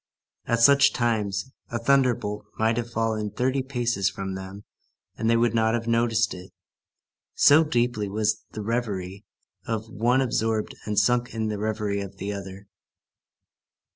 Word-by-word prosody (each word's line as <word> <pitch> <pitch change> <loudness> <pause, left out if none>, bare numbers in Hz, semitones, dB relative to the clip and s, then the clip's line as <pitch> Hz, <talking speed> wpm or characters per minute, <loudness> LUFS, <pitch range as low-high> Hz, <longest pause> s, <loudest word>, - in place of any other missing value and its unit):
At 115 0 +1
such 140 +2 +6
times, 110 -1 -1 0.2
a 115 - -2
thunderbolt 115 -5 +1
might 110 +1 +2
have 120 -1 -2
fallen 110 -2 -1
thirty 130 +5 0
paces 120 -7 0
from 95 0 -5
them, 95 +2 -8 0.5
and 110 - -1
they 115 - +4
would 115 -1 +2
not 110 0 +2
have 115 -1 -3
noticed 115 -1 +2
it, 90 +1 -10 0.9
so 145 +3 +6
deeply 120 -8 0
was 105 +1 0
the 110 - -5
reverie 100 -4 -3 0.4
of 110 -1 -2
the 115 - -18
one 120 +4 +2
absorbed 110 -3 -1
and 105 -1 -2
sunk 120 +3 +2
in 110 -1 -1
the 105 -1 -3
reverie 105 -1 -2
of 100 0 -8
the 100 +2 -4
other. 100 0 -8
110 Hz, 155 wpm, -25 LUFS, 105-120 Hz, 0.9 s, such